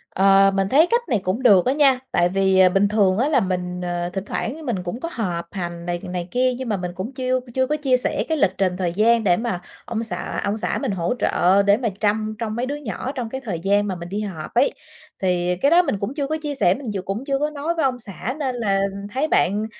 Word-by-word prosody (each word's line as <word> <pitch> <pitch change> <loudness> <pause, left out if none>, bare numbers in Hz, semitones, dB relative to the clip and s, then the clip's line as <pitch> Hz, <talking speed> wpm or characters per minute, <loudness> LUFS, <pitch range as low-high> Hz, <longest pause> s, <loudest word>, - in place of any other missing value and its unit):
Ờ, 195 0 +5
mình 195 -1 +1
thấy 310 +8 +5
cách 475 +1 +3
này 225 -6 +2
cũng 200 +8 -2
được 195 -7 +6
á 255 - +2
nha, 275 -3 +4
tại 175 0 +2
vì, 190 0 +2
ờ, 185 -1 +7
bình 195 +2 +3
thường 200 -3 +2
á 255 +5 +2
là 300 - +3
mình, 180 -1 -2
ờ, 175 0 -2
thỉnh 195 0 -4
thoảng 295 +9 -4
mình 210 -9 -2
cũng 180 +7 -5
có 335 - -4
họp 180 - -3
hành 170 -2 -5
này 175 0 -2
này 180 -1 -4
kia, 255 0 +2
nhưng 260 -2 -5
mà 210 - 0
mình 180 -1 -4
cũng 195 +8 -5
chiêu 255 -1 0
chưa 260 +1 +1
có 300 - 0
chia 270 -4 +2
sẻ - - 0
cái 320 - +1
lịch 200 -9 +3
trình 185 -2 0
thời 180 -2 -1
gian 225 +4 +3
để 175 -4 +3
mà 225 -7 -3 0.2
ông 230 0 -3
xã 225 - -4
ông 205 +1 -1
xã 220 - -1
mình - - -1
hỗ 175 0 -1
trợ 190 +3 +3
để 200 +1 +4
mà 235 -2 -1
trăm 215 +1 0
trông 220 -2 -3
mấy 240 +2 -1
đứa 280 +3 -3
nhỏ 260 -3 -5
trong 250 -5 -4
cái 265 +3 -5
thời 190 -9 -3
gian 200 +3 +1
mà 190 - -2
mình 170 0 -8
đi 205 +3 -3
họp 185 -7 -6
ấy. 250 +4 +3 0.5
Thì 180 -1 +1
cái 280 - +4
đó 345 +2 +7
mình 205 - -2
cũng 200 +6 -3
chưa 285 -2 -2
có 310 +2 -1
chia 295 -2 -3
sẻ, 180 -9 +3
mình 250 0 -6
ch 190 -2 -4
cũng 205 +7 -4
chưa 275 -1 0
có 300 +1 0
nói 305 +3 -3
với 325 - 0
ông 255 -2 0
xã 220 +3 -5
nên 265 -4 -1
là 200 -5 0 0.3
thấy 270 +6 0
bạn 205 - +2
210 Hz, 270 wpm, -22 LUFS, 185-260 Hz, 0.5 s, ờ